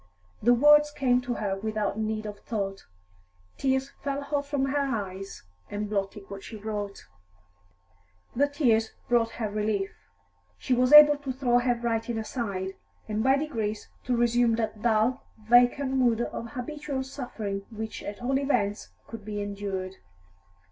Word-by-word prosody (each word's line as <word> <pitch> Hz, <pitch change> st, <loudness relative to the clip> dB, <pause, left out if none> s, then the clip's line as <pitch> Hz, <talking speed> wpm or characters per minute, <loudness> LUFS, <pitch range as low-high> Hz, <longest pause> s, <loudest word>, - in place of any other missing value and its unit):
The 240 Hz, +2 st, +5 dB
words 295 Hz, +3 st, +6 dB
came 255 Hz, -4 st, +2 dB
to 245 Hz, -1 st, -3 dB
her 200 Hz, -2 st, -1 dB
without 215 Hz, -1 st, -2 dB
need 215 Hz, 0 st, -2 dB
of 205 Hz, -1 st, -6 dB
thought; 195 Hz, -3 st, -4 dB, 0.7 s
tears 265 Hz, 0 st, 0 dB
fell 280 Hz, 0 st, -2 dB
hot 285 Hz, 0 st, -2 dB
from 285 Hz, -2 st, 0 dB
her 280 Hz, +2 st, 0 dB
eyes 200 Hz, -8 st, -4 dB, 0.3 s
and 210 Hz, +1 st, -3 dB
blotted 200 Hz, 0 st, -3 dB
what 200 Hz, -1 st, -8 dB
she 225 Hz, -, -9 dB
wrote. 205 Hz, -1 st, -5 dB, 1.3 s
The 285 Hz, +4 st, +3 dB
tears 235 Hz, -7 st, +1 dB
brought 230 Hz, -2 st, +2 dB
her 225 Hz, -2 st, -2 dB
relief; 210 Hz, -1 st, -1 dB, 0.7 s
she 255 Hz, -, -1 dB
was 250 Hz, +1 st, +3 dB
able 295 Hz, -1 st, +10 dB
to 285 Hz, -2 st, -5 dB
throw 250 Hz, -2 st, +2 dB
her 245 Hz, 0 st, +1 dB
writing 230 Hz, 0 st, -2 dB
aside, 200 Hz, -5 st, -3 dB, 0.3 s
and 215 Hz, 0 st, -1 dB
by 265 Hz, +2 st, +4 dB
degrees 225 Hz, -8 st, -3 dB, 0.2 s
to 245 Hz, -1 st, +1 dB
resume 240 Hz, -1 st, +3 dB
that 220 Hz, -2 st, -3 dB
dull, 235 Hz, +3 st, +2 dB, 0.2 s
vacant 245 Hz, +4 st, +4 dB
mood 245 Hz, -3 st, +2 dB
of 235 Hz, 0 st, -5 dB
habitual 280 Hz, +1 st, -4 dB
suffering 220 Hz, -7 st, -5 dB
which 220 Hz, -1 st, -6 dB
at 205 Hz, +3 st, -7 dB
all 265 Hz, +2 st, +1 dB
events 225 Hz, -7 st, 0 dB, 0.2 s
could 225 Hz, -2 st, -9 dB
be 210 Hz, 0 st, -4 dB
endured. 200 Hz, -2 st, -4 dB
230 Hz, 150 wpm, -27 LUFS, 210-265 Hz, 1.3 s, able